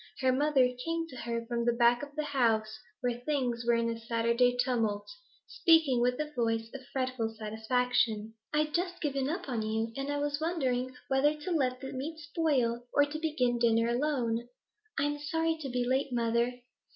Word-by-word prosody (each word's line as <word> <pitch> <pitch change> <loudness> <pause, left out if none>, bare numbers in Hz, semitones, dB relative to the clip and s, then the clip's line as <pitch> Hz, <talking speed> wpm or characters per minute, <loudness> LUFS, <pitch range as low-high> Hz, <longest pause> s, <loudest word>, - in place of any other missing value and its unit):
Her 260 -1 +4
mother 270 -1 +4 0.2
came 330 0 -2
to 255 - -10
her 235 -1 -3
from 235 0 -1
the 240 0 +2
back 235 0 +4
of 290 0 -8
the 305 - -1
house, 225 -6 +1 0.2
where 245 -2 -1
things 245 -3 -1
were 235 - +5
in 230 0 0
Saturday 235 +2 +2
tumult, 230 -5 0 0.4
speaking 320 -7 +4
with 250 +2 +1
a 300 0 -3
voice 225 -1 0
of 275 -1 -7
fretful 255 -4 -2
satisfaction. 220 0 0 0.2
'I'd 300 0 +1
just 355 +1 -1
given 275 -3 -1
you 290 - 0
up, 360 -1 -5
and 240 -4 -1
was 275 +7 -2
wondering 260 -6 -1
whether 280 +3 +3
to 360 - -4
let 255 -6 +1
the 265 - -6
meat 290 +5 -4
spoil 280 -7 0
or 285 - +4
begin 290 -5 0
dinner 230 0 +3
alone.' 240 -3 0 0.5
'I 275 - +2
am 290 0 -1
sorry 325 +2 0
to 275 - -4
be 245 0 0
late, 265 +2 +1
mother.' 235 0 +1
255 Hz, 175 wpm, -31 LUFS, 235-290 Hz, 0.5 s, were